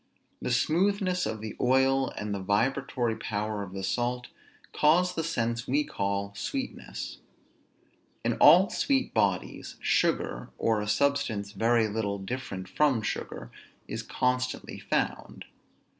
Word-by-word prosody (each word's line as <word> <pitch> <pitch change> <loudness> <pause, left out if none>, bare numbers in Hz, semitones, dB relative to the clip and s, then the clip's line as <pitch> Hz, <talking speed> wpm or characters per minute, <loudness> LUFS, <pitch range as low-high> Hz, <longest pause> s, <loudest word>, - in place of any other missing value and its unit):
The - - -2
smoothness 180 - +2
of 110 -1 -4
the 110 -1 -6
oil 135 +1 +3
and 105 -1 -3
the 100 - -2
vibratory 115 +4 0
power 105 -1 -3
of 95 -2 -7
the 95 0 -5
salt 125 +3 -1 0.4
cause 175 +4 +4
the 165 - -2
sense 120 -6 -1
we 145 +4 +2
call 100 -4 -2
sweetness. 265 - -5 1.1
In - - +2
all - - +7
sweet 270 -2 +1
bodies, 95 -3 -1
sugar, - - 0
or 110 -2 +1
a 105 - -4
substance 110 -5 +1
very 115 +1 +2
little 100 -1 -2
different 100 -2 -5
from 135 -5 +2
sugar, - - -4 0.4
is - - -4
constantly 125 0 -1
found. - - -2
120 Hz, 130 wpm, -28 LUFS, 105-140 Hz, 1.1 s, all